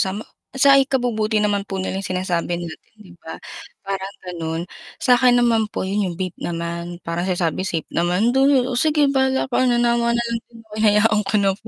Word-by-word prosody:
kasama 215 - -5
ko, - - -27 0.2
sa 275 +1 +5
ikabubuti 235 -5 0
naman 205 -1 0
po 195 - -5
nila 190 0 -3
'yung 195 - -5
sinasabi 175 -1 -1
natin 165 - -10
'di 205 -5 -16
ba, 160 - -8 0.5
parang 195 0 -4
gano'n. 165 -2 -4 0.4
Sa'kin 250 -1 +5
naman 225 -2 +2
po, - - -4
'yung 190 -2 -1
vape 185 -1 -5
naman, 170 +1 -4
parang 170 +2 -3
sinasabi 175 -1 -1
safe 165 -4 -3
naman, 180 +7 +1
though, 265 -1 +3
"Oh, 245 - 0
sige 295 -2 +3
bahala 265 -1 +1
ka," - - +1
nanawa 235 -1 +2
na 235 - 0
lang 230 0 -1
din 235 - -17
ako, 215 -1 -17
hinayaan 210 0 +4
ko 205 - 0
na 195 - +3
po 225 - -14
210 Hz, 195 wpm, -21 LUFS, 180-240 Hz, 0.5 s, sa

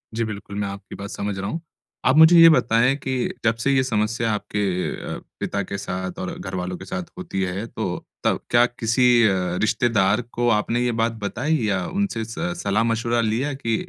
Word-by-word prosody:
जी, 115 - 0
बिल्कुल 105 -2 -6
मैं 100 - -1
आपकी 100 0 -8
बात 100 0 -7
समझ 100 -1 -4
रहा 100 +2 -3
हूँ। 165 - -4 0.4
आप 130 - +4
मुझे 160 +2 +8
ये 165 0 +10
बताएँ 125 -2 +3
कि 130 - -2 0.3
जब 110 0 +3
से 140 - +2
ये 130 -1 +3
समस्या 115 -1 0
आपके 105 0 -3 0.6
अ, - - -9 0.2
पिता 100 - -2
के 100 +2 -5
साथ 95 -1 -5
और 95 - -4
घरवालों 90 -1 -4
के - - -10
साथ 190 -1 -4
होती 170 - -4
है, 95 +4 -3
तो - - -4 0.2
तब - - +1
क्या 120 0 +5
किसी 120 +1 +1 0.2
अ, 90 -4 +1
रिश्तेदार 110 -1 +2 0.2
को 120 - +2
आपने 115 +3 -1
ये 125 - +1
बात 115 0 +2
बताई 145 +10 0
या 95 -3 0 0.2
उनसे 145 - -1
स 170 +11 -3
सलाह-मशविरा 115 +3 +1
लिया 115 +7 0
कि 115 -4 -1
115 Hz, 195 wpm, -23 LUFS, 100-125 Hz, 0.6 s, ये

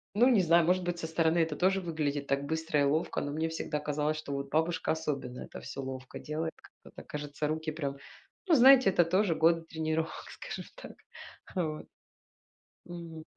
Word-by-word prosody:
Ну, 240 +4 +6
не 230 -6 +5
знаю, 170 -1 +4
может 180 +2 +2
быть, 175 -1 -2
со 160 - -3
стороны 160 +1 +2
это 160 -2 +1
тоже 190 +4 +2
выглядит 150 -5 -2
так 140 +1 0
быстро 160 0 -1
и - - +4
ловко, 150 +4 0
но 145 - -3
мне 160 +2 -1
всегда 160 -2 -3
казалось, 150 +1 -1
что 155 -2 -6
вот 140 0 -4
бабушка, 165 +4 0
особенно, 140 -6 -3
это - - -8
всё 135 0 -6
ловко 130 -1 -7
делает. 160 +2 -3 0.3
Как - - -16
бы - - -9
кажется, 150 0 -4
руки 155 +1 -2
прям 140 -3 -4 0.5
Ну, 340 - +5
знаете, 260 -2 +8
это 175 -2 +3
тоже 185 0 +2
годы 165 +1 +4
тренировок, 160 0 -3
скажем - - -7
так. - - -10 0.6
Вот. 155 -4 -2 1.0
Мгм. 170 -2 -8
160 Hz, 185 wpm, -30 LUFS, 150-170 Hz, 1.0 s, знаете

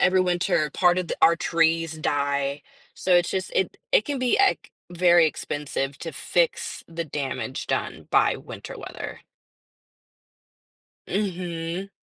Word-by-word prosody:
Every 185 +1 +4
winter, 175 -3 +1
part 180 -1 +4
of 180 - -3
the - - -2
our 170 - +7
trees 165 -1 +1
die. 140 -1 -1 0.3
So 185 - +2
it's 175 0 +2
just 190 0 -2
it 190 - 0 0.2
it 210 - +5
can 285 -2 -2
be 250 -2 +2
ex 395 - +2 0.2
very 175 -1 +5
expensive 140 -2 -3
to 165 - -6
fix - - -1
the 165 0 -4
damage 135 -4 -4
done - - -2
by - - +4
winter - - -9
weather. - - -7 1.9
Mhm. 180 -2 -3
170 Hz, 135 wpm, -25 LUFS, 150-185 Hz, 1.9 s, our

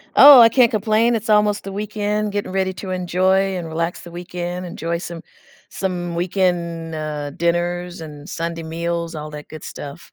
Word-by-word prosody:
Oh, 280 -3 +11
I 230 - +9
can't 240 -1 +5
complain, 220 +2 +2
it's 225 +1 -3
almost 210 -1 +3
the 195 - -6
weekend, 210 0 -2
getting 205 -2 -3
ready 190 0 0
to 185 0 -7
enjoy 185 +2 +1
and 175 - -4
relax 165 +2 -3
the 170 - -11
weekend, 175 +1 -5
enjoy 170 -1 -3
some 170 -1 -7 0.5
some 175 -3 -3
weekend, 170 -2 -1
uh, 150 -2 -4
dinners 175 +2 -1
and 150 -2 -9
Sunday 165 0 -4
meals, 170 +1 -3
all 150 0 -6
that 150 0 -9
good 155 -1 -10
stuff. 145 +4 -9
175 Hz, 170 wpm, -20 LUFS, 165-195 Hz, 0.5 s, Oh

